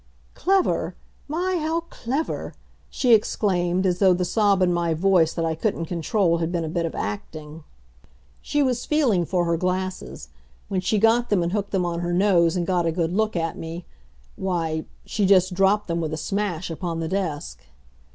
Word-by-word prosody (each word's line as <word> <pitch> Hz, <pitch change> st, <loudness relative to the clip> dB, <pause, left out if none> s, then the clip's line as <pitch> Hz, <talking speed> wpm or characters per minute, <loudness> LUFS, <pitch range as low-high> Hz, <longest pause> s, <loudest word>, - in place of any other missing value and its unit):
"Clever! 385 Hz, 0 st, +1 dB, 0.3 s
My, 355 Hz, +4 st, -1 dB
how 320 Hz, +2 st, 0 dB
clever!" 270 Hz, +7 st, -3 dB, 0.3 s
she 250 Hz, -3 st, +2 dB
exclaimed, 185 Hz, -4 st, +1 dB
as 180 Hz, -1 st, +1 dB
though 190 Hz, -2 st, +5 dB
the 180 Hz, 0 st, -1 dB
sob 200 Hz, -1 st, +2 dB
in 180 Hz, -1 st, +2 dB
my 170 Hz, -1 st, 0 dB
voice 175 Hz, -2 st, +3 dB
that 165 Hz, -, -1 dB
I 160 Hz, -, 0 dB
couldn't 165 Hz, 0 st, -2 dB
control 170 Hz, +1 st, 0 dB
had 165 Hz, 0 st, -1 dB
been 170 Hz, -2 st, -1 dB
a -, -, -4 dB
bit 170 Hz, 0 st, -1 dB
of -, -, -7 dB
acting. 150 Hz, +10 st, -6 dB, 0.8 s
She 290 Hz, 0 st, 0 dB
was 250 Hz, -2 st, 0 dB
feeling 245 Hz, -, +2 dB
for 175 Hz, 0 st, 0 dB
her 170 Hz, 0 st, +1 dB
glasses. 185 Hz, +2 st, -3 dB, 0.4 s
When 190 Hz, -2 st, -1 dB
she 200 Hz, +4 st, +1 dB
got 225 Hz, +3 st, +3 dB
them 195 Hz, -4 st, +2 dB
and 170 Hz, -, -1 dB
hooked 205 Hz, 0 st, -2 dB
them 185 Hz, -3 st, 0 dB
on 170 Hz, -1 st, -2 dB
her 175 Hz, 0 st, -2 dB
nose 175 Hz, -3 st, +3 dB
and 175 Hz, -1 st, 0 dB
got 175 Hz, -2 st, +1 dB
a -, -, +2 dB
good 165 Hz, 0 st, -1 dB
look 215 Hz, +1 st, 0 dB
at 165 Hz, -1 st, -2 dB
me 165 Hz, +2 st, -6 dB, 0.5 s
why, 165 Hz, -4 st, -2 dB, 0.2 s
she 205 Hz, -3 st, 0 dB
just 185 Hz, -1 st, +4 dB
dropped 195 Hz, +3 st, +2 dB
them 170 Hz, -1 st, -1 dB
with 155 Hz, -1 st, -3 dB
a -, -, -2 dB
smash 190 Hz, -1 st, -2 dB
upon 165 Hz, 0 st, -4 dB
the 165 Hz, -, -2 dB
desk. 170 Hz, -4 st, -3 dB
180 Hz, 190 wpm, -24 LUFS, 170-205 Hz, 0.8 s, though